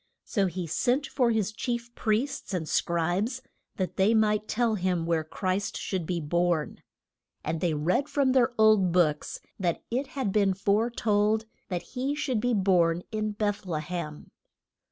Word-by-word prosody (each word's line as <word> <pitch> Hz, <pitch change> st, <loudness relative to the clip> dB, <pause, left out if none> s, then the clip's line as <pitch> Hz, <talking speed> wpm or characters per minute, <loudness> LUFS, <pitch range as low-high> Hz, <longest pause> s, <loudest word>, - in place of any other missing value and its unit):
So 200 Hz, -4 st, +1 dB
he 180 Hz, 0 st, -4 dB
sent 245 Hz, -, +1 dB
for 250 Hz, -4 st, +1 dB
his 215 Hz, -3 st, +1 dB
chief 235 Hz, +1 st, -4 dB
priests 225 Hz, 0 st, -1 dB
and 160 Hz, -3 st, -3 dB
scribes 175 Hz, -, 0 dB, 0.3 s
that 185 Hz, -2 st, -3 dB
they 205 Hz, +4 st, +4 dB
might 215 Hz, -1 st, +2 dB
tell 235 Hz, 0 st, +1 dB
him 180 Hz, -4 st, 0 dB
where 165 Hz, -1 st, +1 dB
Christ 185 Hz, +5 st, -2 dB
should 180 Hz, -5 st, -3 dB
be 175 Hz, -2 st, -1 dB
born. 170 Hz, 0 st, 0 dB, 0.6 s
And 165 Hz, -, -2 dB
they 170 Hz, -4 st, +1 dB
read 180 Hz, -, +1 dB
from 275 Hz, -2 st, +2 dB
their 255 Hz, -2 st, +4 dB
old 215 Hz, -4 st, +5 dB
books 160 Hz, -4 st, +1 dB, 0.2 s
that 175 Hz, -3 st, -1 dB
it 260 Hz, +4 st, -1 dB
had 255 Hz, -7 st, 0 dB
been 195 Hz, -2 st, +2 dB
fore 205 Hz, +4 st, +2 dB
told 215 Hz, -1 st, +1 dB, 0.2 s
that 180 Hz, -3 st, -2 dB
he 270 Hz, +3 st, -1 dB
should 280 Hz, -6 st, -1 dB
be 245 Hz, +1 st, +1 dB
born 180 Hz, -3 st, +3 dB
in 215 Hz, -1 st, -2 dB
Beth 205 Hz, 0 st, -1 dB
le 160 Hz, -3 st, -1 dB
hem. 155 Hz, -2 st, -6 dB
205 Hz, 165 wpm, -28 LUFS, 175-230 Hz, 0.6 s, old